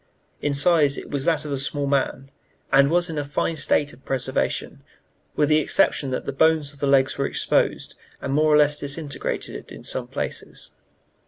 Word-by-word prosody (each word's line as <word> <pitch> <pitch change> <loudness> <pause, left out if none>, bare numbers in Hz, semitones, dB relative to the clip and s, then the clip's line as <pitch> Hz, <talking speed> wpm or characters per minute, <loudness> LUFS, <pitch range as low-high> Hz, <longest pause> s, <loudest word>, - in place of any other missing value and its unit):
In 145 -1 -1
size 145 -1 +3
it - - -8
was 140 -2 -2
that 160 -3 +1
of 150 - -5
a 140 - -2
small 145 +1 -2
man, 135 -1 -1 0.4
and 140 +1 +5
was 175 +2 +2
in 160 -3 -3
a - - -2
fine 145 +3 -2
state 145 -1 +1
of 135 - -18
preservation, 130 0 -2 0.5
with 150 - +2
the 155 0 +5
exception 140 -2 +2
that 130 - -3
the - - -2
bones 155 0 +2
of 140 - -17
the 140 - -1
legs 135 0 +3
were 140 - +1
exposed, - - 0 0.3
and 135 - -3
more 155 +1 +3
or 150 - +6
less 150 0 +3
disintegrated, 145 +1 -4
in - - -10
some - - -2
places. - - -6
145 Hz, 190 wpm, -23 LUFS, 140-155 Hz, 0.5 s, or